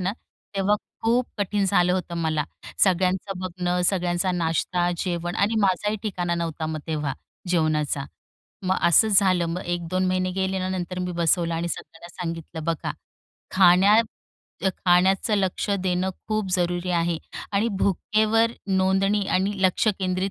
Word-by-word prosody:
ना, 185 Hz, +2 st, -1 dB, 0.4 s
तेव्हा 195 Hz, +2 st, +3 dB, 0.3 s
खूप 235 Hz, +2 st, +2 dB
कठीण 200 Hz, 0 st, 0 dB
झालं 180 Hz, -2 st, +3 dB
होतं 180 Hz, -2 st, -2 dB
मला 155 Hz, -2 st, 0 dB, 0.4 s
सगळ्यांचं 185 Hz, +1 st, 0 dB
बघणं, 180 Hz, -1 st, -2 dB
सगळ्यांचा 180 Hz, 0 st, +1 dB
नाश्ता, 175 Hz, +1 st, 0 dB
जेवण 175 Hz, 0 st, -3 dB
आणि 210 Hz, +3 st, +1 dB
माझाही 205 Hz, +2 st, +1 dB
ठिकाणा 180 Hz, -5 st, -2 dB
नव्हता 165 Hz, -2 st, -3 dB
मग 155 Hz, 0 st, -3 dB
तेव्हा 150 Hz, -4 st, -2 dB, 0.4 s
जेवणाचा. 155 Hz, -4 st, +1 dB, 0.6 s
मग 185 Hz, +1 st, +1 dB
असंच 205 Hz, +4 st, +5 dB
झालं 185 Hz, -4 st, +2 dB
मग 180 Hz, -, -3 dB
1-2 175 Hz, +1 st, -1 dB
महिने 185 Hz, 0 st, 0 dB
गेले 190 Hz, 0 st, -1 dB
आणि 185 Hz, 0 st, -2 dB
नंतर 180 Hz, +1 st, -4 dB
मी 180 Hz, 0 st, -2 dB
बसवला 170 Hz, 0 st, +1 dB
आणि 170 Hz, +1 st, -2 dB
सगळ्यांना 165 Hz, +1 st, -7 dB
सांगितलं, 165 Hz, -1 st, -5 dB
बघा 165 Hz, -1 st, -2 dB, 0.6 s
खाण्यात 195 Hz, +4 st, +6 dB, 0.8 s
खाण्याचं 190 Hz, +4 st, +4 dB
लक्ष 190 Hz, +1 st, -1 dB
देणं 185 Hz, -1 st, 0 dB, 0.2 s
खूप 215 Hz, -3 st, -1 dB
जरुरी 180 Hz, 0 st, 0 dB
आहे 170 Hz, -1 st, +1 dB, 0.4 s
आणि 205 Hz, +4 st, +2 dB
भुकेवर 215 Hz, +4 st, +2 dB, 0.2 s
नोंदणी 195 Hz, +2 st, +2 dB
आणि 195 Hz, +2 st, 0 dB
लक्ष 185 Hz, +4 st, +2 dB
केंद्रित 185 Hz, +1 st, -1 dB
185 Hz, 140 wpm, -24 LUFS, 175-195 Hz, 0.8 s, खाण्यात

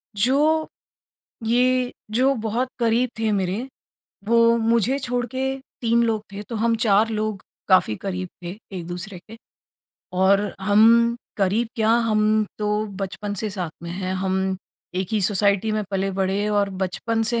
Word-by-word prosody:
जो, 295 Hz, +8 st, +2 dB, 0.8 s
ये 250 Hz, +2 st, +2 dB, 0.2 s
जो 260 Hz, +5 st, +3 dB
बहुत 235 Hz, +4 st, -1 dB
करीब 235 Hz, +1 st, +2 dB
थे 220 Hz, -1 st, +1 dB
मेरे, 195 Hz, +5 st, -1 dB, 0.6 s
वो 230 Hz, +1 st, +4 dB
मुझे 230 Hz, +3 st, +2 dB
छोड़ 245 Hz, -2 st, -2 dB
के 260 Hz, -, -1 dB, 0.4 s
3 235 Hz, 0 st, +3 dB
लोग 220 Hz, -2 st, -1 dB
थे, 205 Hz, +1 st, -6 dB
तो 225 Hz, +2 st, -6 dB
हम 230 Hz, +1 st, +2 dB
4 215 Hz, -1 st, +3 dB
लोग 215 Hz, -2 st, -2 dB, 0.3 s
काफ़ी 185 Hz, -, +4 dB
करीब 185 Hz, -2 st, -4 dB
थे 175 Hz, -, -5 dB, 0.3 s
एक-दूसरे 180 Hz, +2 st, -6 dB
के 225 Hz, -, -10 dB, 0.9 s
और 200 Hz, +2 st, +4 dB
हम 230 Hz, +4 st, +5 dB, 0.2 s
करीब 210 Hz, +3 st, +1 dB
क्या 220 Hz, 0 st, +2 dB, 0.2 s
हम 215 Hz, 0 st, +3 dB
तो 210 Hz, 0 st, 0 dB, 0.2 s
बचपन 205 Hz, +2 st, -4 dB
से 215 Hz, +2 st, -3 dB
साथ 180 Hz, -4 st, -4 dB
में 170 Hz, -, -6 dB
हैं, 185 Hz, +1 st, -3 dB
हम 190 Hz, 0 st, -1 dB, 0.4 s
एक 185 Hz, 0 st, -2 dB
ही 215 Hz, -, +2 dB
सोसाइटी 205 Hz, +2 st, +2 dB
में 215 Hz, 0 st, 0 dB
पले-बढ़े 195 Hz, +1 st, 0 dB
और 205 Hz, -1 st, +1 dB
बचपन 225 Hz, +5 st, -2 dB
से 235 Hz, -, +1 dB
215 Hz, 150 wpm, -23 LUFS, 195-230 Hz, 0.9 s, हम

